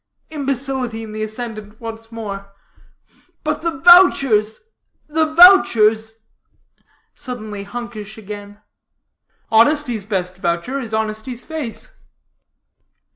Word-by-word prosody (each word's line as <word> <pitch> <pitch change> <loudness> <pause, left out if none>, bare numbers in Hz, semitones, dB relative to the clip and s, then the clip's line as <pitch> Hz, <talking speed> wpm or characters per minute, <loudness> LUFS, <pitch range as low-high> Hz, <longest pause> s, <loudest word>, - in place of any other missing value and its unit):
imbecility 265 -5 -3
in 220 - -9
the 215 0 -6
ascendant 215 -1 -6
once 225 0 -9
more; 200 -3 -7 0.9
"but 305 0 -2
the 335 - 0
vouchers, 275 - +5 0.4
the 315 +1 0
vouchers," 225 - +6 1.0
suddenly 215 -5 -6
hunkish 215 -1 -8
again. 205 -1 -9 0.9
"Honesty's 235 -2 +3
best 185 -3 -3
voucher 175 +10 -2
is 230 -5 -6
honesty's 220 +3 -3
face." 315 - -6
225 Hz, 90 wpm, -19 LUFS, 215-270 Hz, 1.0 s, vouchers